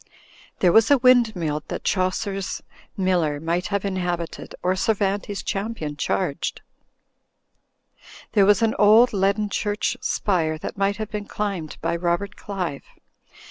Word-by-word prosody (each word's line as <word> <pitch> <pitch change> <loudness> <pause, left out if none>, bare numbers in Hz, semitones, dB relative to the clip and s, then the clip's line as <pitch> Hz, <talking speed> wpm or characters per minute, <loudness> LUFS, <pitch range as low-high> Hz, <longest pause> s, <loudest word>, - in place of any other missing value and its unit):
There 180 - +5
was 225 +4 +5
a 285 - +6
windmill 220 - +3
that - - -5
Chaucer's 195 0 -1 0.3
MU 185 -1 +2
ler 150 -4 0
might 170 +3 -1
have 200 -1 -2
inhabited 175 -3 -3
or 185 +1 +2
Cervantes' 200 0 -1
champion 195 -7 -3
charged. 145 +1 -2 1.7
There 200 -3 +4
was 205 +2 +4
an 225 - +2
old 220 +4 +6
leaden 200 +2 +1
church 205 +3 -1
spire 170 -10 0
that - - -6
might 200 0 0
have 215 -1 -5
been 210 -1 -4
climbed 195 -7 -4
by 165 +1 0
Robert 175 +4 -1
Qive. 180 -8 -4
195 Hz, 135 wpm, -23 LUFS, 175-210 Hz, 1.7 s, a